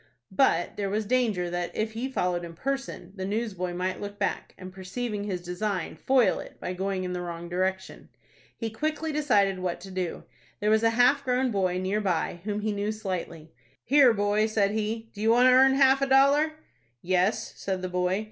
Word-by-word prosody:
But 185 -6 +2
there 200 -1 -1
was 210 +2 -1
danger 215 -7 0
that, 175 0 -2
if 220 +1 -1
he 235 +4 -4
followed 180 -8 -1
in 170 -1 -8
person, 270 -1 -4
the 190 - -4
newsboy 190 -4 -3
might 185 +1 -2
look 205 0 -6
back, 205 - -3
and, 185 0 -10
perceiving 205 +3 -4
his 185 -4 -4
design, 180 0 -3
foil 240 - +2
it - - -11
by 180 - -4
going 190 0 -2
in 180 0 -3
the 180 - -3
wrong 170 -1 -6
direction. 185 +2 -3 0.5
He 225 -2 -4
quickly 310 +6 -2
decided 210 -11 +2
what 180 -1 -3
to 195 +1 -10
do. 185 -2 -3 0.4
There 210 +1 +1
was 220 0 +4
a 225 - +4
half 265 +4 +4
grown 255 -1 +1
boy 185 -3 0
near 190 +3 -1
by 175 -3 -1
whom 210 0 -2
he 215 0 -1
knew 205 +1 -2
slightly. 180 -6 -5 0.3
"Here, 275 -1 +6
boy," 205 0 +1
said 205 -2 +1
he,"do 220 0 -4
you 220 - +2
want 245 +2 +6
to - - +6
earn 265 +1 +6
half 270 0 +5
a 275 - +2
dollar?" 280 +3 +4 0.5
"Yes," 185 +3 +1
said 190 -1 -4
the - - -1
boy. 180 +2 0
205 Hz, 195 wpm, -27 LUFS, 185-240 Hz, 0.5 s, Here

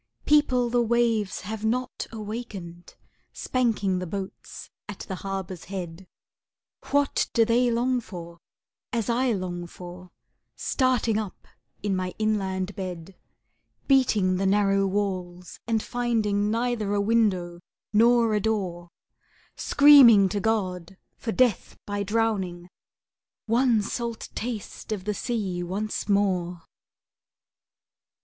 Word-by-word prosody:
People 255 -5 +3
the 245 0 +3
waves 230 -3 +1
have 210 +3 -6
not 250 +3 -2
awakened, 210 -6 -7 0.4
Spanking 215 -7 0
the 180 - -4
boats 190 +2 -7 0.2
at - - -7
the 190 - -6
harbor's 195 -2 -5
head, 180 -1 -7 0.8
What 285 -1 +2
do 230 -1 +4
they 240 +2 +3
long 245 +2 +1
for, 170 -5 -10 0.5
as 235 -1 -1
I 250 +1 +1
long 175 -3 -4
for,— 180 +1 -11 0.5
Starting 245 -5 +1
up 210 -4 -7 0.4
in 200 -2 0
my 185 -1 -3
inland 195 -3 -1
bed, 180 -1 -6 0.7
Beating 215 -9 +3
the 195 +1 0
narrow 195 0 +3
walls, 185 -3 -3
and 225 -2 +1
finding 220 -4 0
Neither 225 -2 0
a - - +1
window 200 -5 +1 0.3
nor 230 +1 +4
a 210 - +2
door, 185 -5 -2 0.7
Screaming 255 -9 +7
to 205 - -2
God 190 -4 -2 0.2
for 225 - -4
death 245 -3 +1
by 205 0 -3
drowning,— 195 -5 -1 0.8
One 235 -1 +3
salt 235 +1 -4
taste 225 -2 -6
of 205 -4 -3
the 210 +2 -1
sea 200 -6 -2
once 205 +4 -3
more? 180 -4 +1
205 Hz, 115 wpm, -26 LUFS, 185-230 Hz, 0.8 s, Screaming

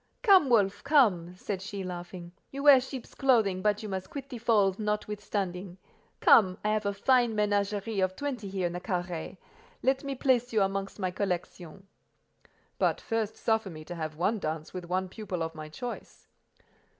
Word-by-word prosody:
"Come, 380 - +6
Wolf; 200 -5 +2
come," 205 - +3
said 190 +1 -4
she, 195 0 -5
laughing: 175 -1 -7 0.2
"you 275 +1 -6
wear 280 -3 +8
sheep's 260 -1 -8
clothing, 220 -9 +2
but 210 +1 +1
you 215 - -5
must 190 -1 -4
quit 275 -1 -7
the 245 -4 -7
fold 210 -4 +2
notwithstanding. 200 -3 -3 0.4
Come; 185 -4 +6
I - - +2
have 215 -1 0
a - - +1
fine 240 +1 +3
menagerie 205 0 0
of 185 0 +1
twenty 255 -7 -4
here 190 -2 -2
in 175 - -1
the 180 - -5
carré: 175 -3 -4 0.5
let 265 +1 +2
me 275 -1 -3
place 250 -2 +1
you 215 -3 +4
amongst 195 0 -3
my 185 -3 -2
collection." 180 -1 -4 0.9
"But - - +2
first 220 -1 -2
suffer 220 -3 0
me 155 -3 -10
to 175 - -7
have 155 -2 -5
one 200 +7 0
dance 155 -2 -4
with 180 -1 -6
one 185 +2 -1
pupil 185 -3 -4
of 160 0 -4
my 155 -1 -8
choice." 240 +10 -8
200 Hz, 175 wpm, -29 LUFS, 180-230 Hz, 0.9 s, wear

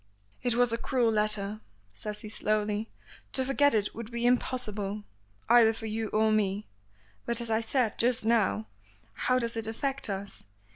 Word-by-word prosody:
"It 245 -2 0
was 245 -1 +3
a 230 - -1
cruel 245 -4 +1
letter," 210 -1 +1 0.3
says 210 - -6
he 215 - -8
slowly; 210 0 -1 0.4
"to 260 - +3
forget 280 -1 +3
it 205 -1 0
would 230 -1 -7
be 235 0 -3
impossible, 215 -5 0 0.4
either 230 -1 +6
for 225 - -8
you 220 0 -2
or 215 +1 +2
me. 205 -1 0 0.6
But, 235 0 +1
as 235 -1 -3
I 220 +1 +2
said 230 -1 0
just 240 -1 +3
now, 215 - +2 0.5
how 255 - +1
does 235 -2 -1
it 225 -1 -1
affect 270 +3 -2
us? 195 0 -5
225 Hz, 165 wpm, -29 LUFS, 210-240 Hz, 0.6 s, either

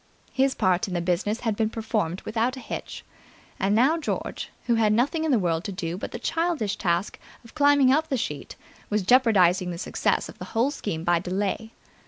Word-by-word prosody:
His 265 0 +2
part 185 -1 +1
in 185 - -4
the - - +1
business 185 +6 -1
had 225 -3 -1
been 220 0 0
performed 215 -6 -2
without 235 +4 -1
a - - -6
hitch. 235 - -7 0.5
And 200 +2 +2
now 275 +9 +4
George, 315 - -4 0.2
who 240 - +2
had 220 -2 +3
nothing 290 +8 +1
in - - 0
the 260 - +4
world 170 -4 0
to 205 - -3
do 170 -2 -4
but 190 - -6
the - - -5
childish 325 - -1
task 175 +2 -1 0.3
of 230 - -15
climbing 285 -3 +5
up 315 +2 +1
the 265 - 0
sheet, 150 - -5 0.3
was 210 -1 0
jeopardizing 185 -6 +4
the 175 - -4
success 175 - 0
of - - -13
the - - -6
whole 250 +5 +3
scheme 200 - -4
by 175 -1 +3
delay. 200 +5 -3
215 Hz, 205 wpm, -25 LUFS, 180-255 Hz, 0.5 s, climbing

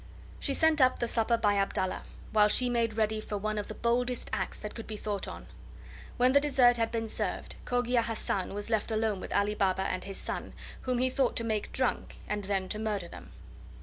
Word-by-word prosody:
She 275 - 0
sent 320 -2 +4
up 255 0 +5
the 240 - -1
supper 230 0 +2
by 205 -3 +2
Abdallah, 190 -1 0 0.3
while 210 -1 +6
she 245 +4 +2
made 230 -2 +1
ready 215 -1 +1
for 210 -1 -4
one 215 +1 -1
of 205 - -4
the 215 - -7
boldest 245 +1 0
acts - - -2
that 210 - -6
could 225 - -8
be 215 - -5
thought 205 -1 -3
on. - - -8 0.7
When 250 +1 +5
the 280 +1 +5
dessert 255 -4 +5
had 225 -1 +1
been 225 -1 -1
served, - - -2
Cogia 245 -1 +2
Hassan 215 -4 -2
was 205 +3 -5
left 220 0 +1
alone 220 -2 0
with - - -7
Ali 205 +1 +2
Baba 190 -2 +1
and 185 -1 -2
his 195 -1 -6
son, - - -5 0.3
whom 255 -1 +1
he 255 +1 +2
thought 260 -1 +1
to 230 - 0
make 220 -2 -2
drunk 255 -1 -1
and 210 -1 -2
then 190 -1 0
to 215 - -3
murder 210 -5 -2
them. - - -11
220 Hz, 215 wpm, -30 LUFS, 205-245 Hz, 0.7 s, while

